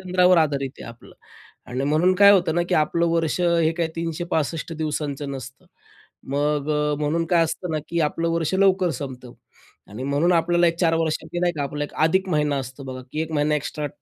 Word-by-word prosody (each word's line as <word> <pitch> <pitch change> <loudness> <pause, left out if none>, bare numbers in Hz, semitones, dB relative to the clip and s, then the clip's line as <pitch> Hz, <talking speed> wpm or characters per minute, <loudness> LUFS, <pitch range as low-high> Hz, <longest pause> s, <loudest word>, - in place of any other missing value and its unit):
चंद्रावर 180 0 +3
आधारित 140 -4 0
आहे - - -8
आपलं 115 0 -14 0.6
आणि 130 +2 -2
म्हणून 160 +6 +3
काय 200 +2 +7
होतं 175 -4 +2
ना, 175 - +2
की - - +1
आपलं 170 +2 +2
वर्ष 165 +1 0
हे 170 -2 +3
काय 165 - +1
365 165 -1 -2
दिवसांचं 150 -3 -3
नसतं. 130 -1 -9 0.7
मग 145 0 0
अ, 150 0 +1
म्हणून 160 +3 0
काय 170 -1 +3
असतं 175 +2 -4
ना, 155 - 0
की 170 - -1
आपलं 165 +2 0
वर्ष 165 +1 -1
लवकर 190 -2 +3
संपतं 130 -3 -7 0.6
आणि 110 +5 -7
म्हणून 145 +6 +1
आपल्याला 175 +1 +3
एक 165 0 +1
4 165 -2 +3
वर्षांनी 160 +1 -2
नाही 175 -1 +1
का, 150 -3 -3
आपला 145 +1 -3
एक - - -10
अधिक 190 +3 +1
महिना 150 -4 +1
असतो 130 +1 -7
बघा, 130 0 -7
की 155 - -2
एक 160 0 -6
महिना 150 0 +1
एक्स्ट्रा. 150 0 -3
160 Hz, 195 wpm, -23 LUFS, 145-170 Hz, 0.7 s, काय